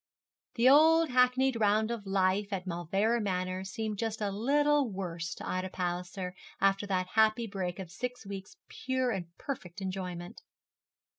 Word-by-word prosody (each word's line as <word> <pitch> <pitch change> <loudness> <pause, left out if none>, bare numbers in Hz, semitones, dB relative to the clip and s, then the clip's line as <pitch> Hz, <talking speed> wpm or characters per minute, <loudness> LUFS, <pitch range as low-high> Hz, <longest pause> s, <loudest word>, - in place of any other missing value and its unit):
The 235 +1 +4
old 320 +4 +6
hackneyed 250 0 +3
round 215 +1 +2
of 225 -3 -4
daily 195 - -5
life 195 +1 +2
at 190 -2 -3
Mauleverer 195 +7 0
Manor 185 -2 -2
seemed 215 +1 -4
just 225 -1 -2
a 205 -2 -1
little 285 +5 +2
worse 175 -3 -4
to - - -8
Ida 185 +1 -2
Palliser 180 +1 -3 0.3
after 195 +1 +2
that 185 -2 0
happy 220 +2 +3
break 190 -4 -4
of 185 -4 -7
six 245 +3 -5
weeks' 195 -1 -7
pure 260 -1 -1
and 185 -5 -3
perfect 200 -10 -6
enjoyment. 185 0 -5
200 Hz, 155 wpm, -31 LUFS, 185-235 Hz, 0.3 s, old